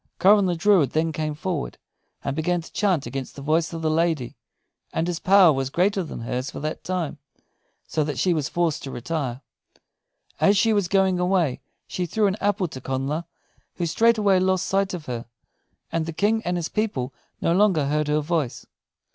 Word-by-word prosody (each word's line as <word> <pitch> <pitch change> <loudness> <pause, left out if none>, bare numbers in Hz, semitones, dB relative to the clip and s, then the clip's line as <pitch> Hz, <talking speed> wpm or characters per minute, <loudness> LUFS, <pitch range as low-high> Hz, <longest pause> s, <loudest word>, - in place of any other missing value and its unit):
Coran 200 +2 +5
the 175 - 0
druid 170 - +3
then 160 +1 +1
came 155 -1 -3
forward, 160 -1 -3 0.5
and 140 - -2
began 175 +3 0
to 165 - -11
chant 185 -9 +1
against 135 -1 -5
the 140 - -8
voice 160 +3 +1
of 165 -1 -6
the 160 - +2
lady. 160 -6 0 0.6
And 160 - -1
his 175 -1 -2
power 190 -4 +6
was 135 -1 -2
greater 190 +6 +1
than 165 - -6
hers 125 +3 -3
for - - -7
that 155 +2 -4
time, 170 -4 -3 0.7
so 155 - 0
that 145 -3 -3
she 180 +8 +2
was 155 -3 -1
forced 170 -3 0
to 135 - -6
retire. 130 -1 -3 1.0
As 200 +1 +4
she 220 +3 +3
was 200 -4 +1
going 190 -1 +2
away 180 -7 +1 0.2
she 180 -1 -3
threw 215 +5 +1
an 195 0 +1
apple 205 -2 +1
to 130 - -8
Connla, 135 +6 -2 0.5
who 175 - -2
straightway 210 +1 +3
lost 185 0 +1
sight 195 -1 0
of 165 -4 -8
her; 120 -2 -5 0.6
and 165 -1 -1
the 165 - -4
King 215 +6 +1
and 180 0 0
his 170 -2 -2
people 170 - -2 0.3
no 165 - +1
longer 185 -6 +3
heard 150 +1 0
her 150 +1 +2
voice. 150 -5 -2
165 Hz, 190 wpm, -24 LUFS, 150-190 Hz, 1.0 s, power